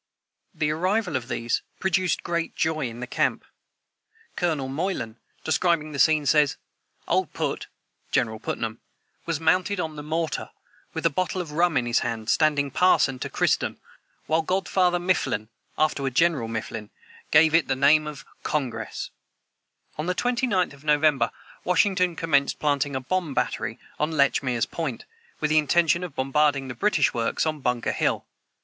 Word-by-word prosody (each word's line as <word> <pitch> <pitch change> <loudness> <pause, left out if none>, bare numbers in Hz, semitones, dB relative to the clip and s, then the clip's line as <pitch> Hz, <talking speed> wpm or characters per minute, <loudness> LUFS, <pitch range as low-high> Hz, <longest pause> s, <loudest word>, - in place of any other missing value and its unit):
The 150 -1 0
arrival 185 +2 0
of 125 -2 -2
these 115 -2 -1 0.2
produced 185 -3 +1
great 170 -1 -2
joy 155 -5 0
in 115 +1 -9
the - - -3
camp. - - 0 0.9
Colonel 155 -7 0
Moylan, 135 - -3 0.3
describing 160 -1 +1
the 140 - -5
scene, 155 -1 +4
says: 145 +1 +3 0.5
"Old - - +1
PUT - - -2 0.4
[General 110 -2 +1
Putnam] 115 0 -4 0.5
was 165 -3 -1
mounted 185 +4 +2
on 160 -3 -3
the - - -5
mortar, 160 +2 -2 0.5
with - - -3
a 165 - +4
bottle 185 +4 -1
of 170 -4 -4
rum 170 0 +2
in 125 - +1
his 120 0 +2
hand, 115 -1 -2
standing 145 -3 +2
parson 135 -6 +3
to - - -4
christen, - - 0 0.5
while 160 +2 +2
god 185 +4 -1
father 180 -2 +3
Mifflin 175 - 0 0.3
[afterward 140 -4 0
General 165 -8 +3
Mifflin] 115 -1 -5 0.4
gave 155 +1 +5
it 165 0 +4
the 135 - +1
name 150 +3 +4
of 150 -2 -8 0.2
Congress." 135 -5 -3 0.9
On 155 - -2
the 180 - 0
29th 240 - +1
of 140 0 -16
November, 150 -4 +3 0.3
Washington 180 -1 +2
commenced 145 -4 +1
planting 145 -1 0
a 130 - -1
bomb 165 0 -2
battery - - -1 0.2
on 150 - +1
Lechmere's 135 -4 +2
point, 150 -9 -4 0.3
with 155 -1 0
the 155 - +6
intention 170 +3 +2
of 180 - -7
bombarding 135 0 +1
the - - -4
British 150 - +2
works 115 +6 0
on 155 -1 -1
Bunker 125 -3 0
hill. - - 0
150 Hz, 155 wpm, -25 LUFS, 135-170 Hz, 0.9 s, the